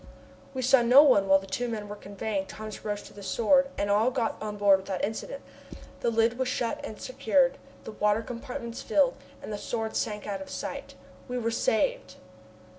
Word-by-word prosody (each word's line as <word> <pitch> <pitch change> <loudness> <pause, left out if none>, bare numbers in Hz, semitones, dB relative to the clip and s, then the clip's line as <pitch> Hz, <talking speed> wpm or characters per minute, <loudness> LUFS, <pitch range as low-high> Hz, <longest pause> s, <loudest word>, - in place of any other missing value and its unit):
We 260 - -2
saw 265 0 +5
no 250 +5 +8
one 205 -9 +4
while 195 0 +7
the 195 - -7
two 245 +6 -2
men 215 -2 -4
were 205 - -6
conveying 200 -1 -4
Thomas 215 -1 -8
Roch 205 -1 -3
to - - -13
the 205 - -11
Sword, 255 +8 +3
and 200 0 0
all 215 +4 +4
got 240 -3 -1
on 210 -1 -4
board 200 -1 +5
without 190 -1 -2
incident. 360 - -6 0.6
The 235 - +1
lid 230 +2 +2
was 260 - +1
shut 240 -2 -2
and 215 - -7
secured, 260 +2 +1 0.2
the - - -7
water 210 +1 +1
compartments 235 -1 -6
filled, 275 -3 +3 0.3
and 215 - -5
the 205 - -4
Sword 225 0 -3
sank 210 -1 -2
out 200 -2 -4
of 190 - -8
sight. - - -6 0.3
We 250 -1 -3
were 230 -1 -1
saved! - - 0
225 Hz, 195 wpm, -28 LUFS, 205-250 Hz, 0.6 s, no